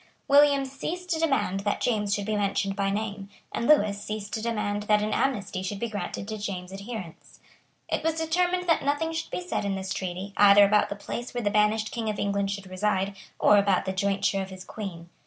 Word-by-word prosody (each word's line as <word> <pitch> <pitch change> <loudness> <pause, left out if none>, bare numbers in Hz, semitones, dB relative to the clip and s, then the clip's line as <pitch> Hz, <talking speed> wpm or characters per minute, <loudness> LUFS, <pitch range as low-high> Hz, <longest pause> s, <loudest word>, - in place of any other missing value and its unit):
William 280 -1 +5
ceased 345 +7 -5
to 320 - +1
demand 275 - +1
that 205 +1 -1
James 210 -4 0
should 200 0 0
be 215 0 -1
mentioned 195 -1 0
by 195 0 0
name; 200 -1 -3 0.2
and 235 - -2
Lewis 210 -9 +4
ceased 210 -1 -5
to 220 - -2
demand 210 -3 -1
that 210 0 +4
an 215 - -1
amnesty 205 -8 -1
should 190 +2 -3
be 235 - -2
granted 200 -1 -4
to 215 0 -5
James's 195 -1 -5
adherents. 200 -7 -8 0.5
It - - -1
was 325 0 +1
determined 355 +3 0
that 330 - +3
nothing 290 +4 0
should 325 - -3
be 360 - -5
said 345 - -1
in 200 -1 -1
the 190 - -4
treaty, 190 +1 -4
either 205 0 +8
about 210 +1 +3
the 200 - -3
place 240 +4 -6
where 240 - -1
the 205 - +1
banished 215 +1 +2
King 225 -2 -2
of 210 - -2
England 200 -1 0
should 200 -1 -4
reside, 195 +1 -1 0.2
or 210 - +5
about 200 -2 +2
the 190 - -2
jointure 195 0 +1
of 190 - -5
his 185 -1 -9
Queen. 175 -6 -7
205 Hz, 215 wpm, -27 LUFS, 195-240 Hz, 0.5 s, either